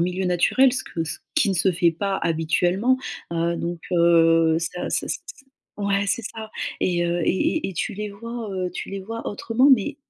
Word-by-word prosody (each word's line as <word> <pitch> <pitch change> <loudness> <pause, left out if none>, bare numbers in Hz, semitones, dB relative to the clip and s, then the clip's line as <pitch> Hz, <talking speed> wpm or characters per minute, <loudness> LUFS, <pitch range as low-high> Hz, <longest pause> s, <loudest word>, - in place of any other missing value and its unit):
milieu 180 +2 0
naturel 185 +9 +3
ce 260 - -2
que 165 - -4
ce 160 - -4 0.2
qui 310 -9 +3
ne - - 0
se 185 +2 +2
fait 170 0 +3
pas 195 +4 -2
habituellement. 175 +8 +2 0.4
Heu, 170 0 0
donc, 170 0 -4
heu, 165 -2 +4
ça 170 +2 -3
ça - - -1
ç - - -2
ç 270 - -13 0.3
ouais, 200 -1 0
c'est 235 - 0
ça. 220 0 -7 0.3
Et, 175 -1 +1
heu, 175 0 0
et - - 0 0.3
et 315 - -1
et - - -8
tu 185 - -2
les 210 +1 -4
vois, 230 +2 -6
heu 185 -1 -2
tu 180 - -6
les 195 0 -4
vois 225 +4 -6
autrement, 225 +6 +2
mais 260 +5 -4
185 Hz, 210 wpm, -23 LUFS, 170-215 Hz, 0.4 s, heu